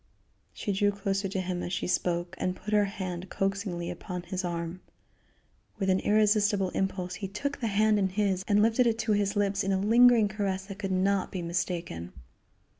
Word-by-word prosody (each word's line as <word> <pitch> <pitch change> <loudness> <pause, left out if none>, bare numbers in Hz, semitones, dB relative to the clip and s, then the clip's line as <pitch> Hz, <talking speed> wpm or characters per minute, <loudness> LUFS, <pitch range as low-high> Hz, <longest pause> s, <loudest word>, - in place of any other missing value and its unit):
She 205 - -3
drew 205 +1 +2
closer 195 -1 -2
to 190 0 -2
him 180 -1 -3
as 175 - -4
she 180 - -2
spoke 175 -1 -1
and 185 0 -1
put 210 +3 -6
her 210 -1 +4
hand 185 -2 -5
coaxingly 195 -3 -2
upon 180 0 -6
his 185 +2 -4
arm. 170 0 -4 1.0
With 195 -2 +1
an 185 - +3
irresistible 205 -2 +2
impulse 185 -2 -2
he 200 +1 -5
took 280 +9 -4
the 230 - -1
hand 215 +1 +3
in 190 -1 +1
his 190 -1 0
and 210 0 +4
lifted 230 +2 +3
it 225 -1 +1
to 225 -1 -1
his 205 -1 +1
lips 200 0 +1
in 195 - 0
a 190 - +2
lingering 230 +2 +6
caress 200 -2 -2
that 195 0 -9
could 195 -2 -3
not 190 +1 +1
be 180 -2 -4
mistaken. 170 - -3
195 Hz, 190 wpm, -28 LUFS, 185-210 Hz, 1.0 s, lingering